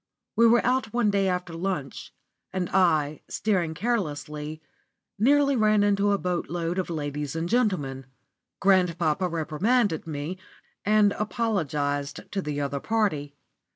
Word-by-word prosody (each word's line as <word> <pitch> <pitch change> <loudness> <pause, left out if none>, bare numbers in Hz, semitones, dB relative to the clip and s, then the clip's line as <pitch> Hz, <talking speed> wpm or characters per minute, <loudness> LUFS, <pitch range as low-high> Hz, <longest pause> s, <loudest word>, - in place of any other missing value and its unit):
We 230 +2 +6
were 235 +1 +4
out 250 -2 +1
one 235 -4 +2
day 200 -1 +2
after 180 -2 -2
lunch, 165 -5 -4 0.4
and 185 -2 -2
I, 155 -6 +2
steering 180 -7 0
carelessly, 155 -8 -3 0.6
nearly 280 +4 +4
ran 215 -3 +3
into 205 0 +2
a 200 - +3
boatload 175 -1 -2
of 185 - -2
ladies 145 -2 -3
and 165 +1 -2
gentlemen. 160 - 0 0.5
Grandpapa 180 -3 +2
reprimanded 170 - 0
me, 155 +4 -4 0.4
and 210 -1 +4
apologised 150 - -1
to 195 - -1
the 150 -3 -3
other 140 0 -2
party. 155 -9 -1
180 Hz, 125 wpm, -26 LUFS, 150-210 Hz, 0.6 s, We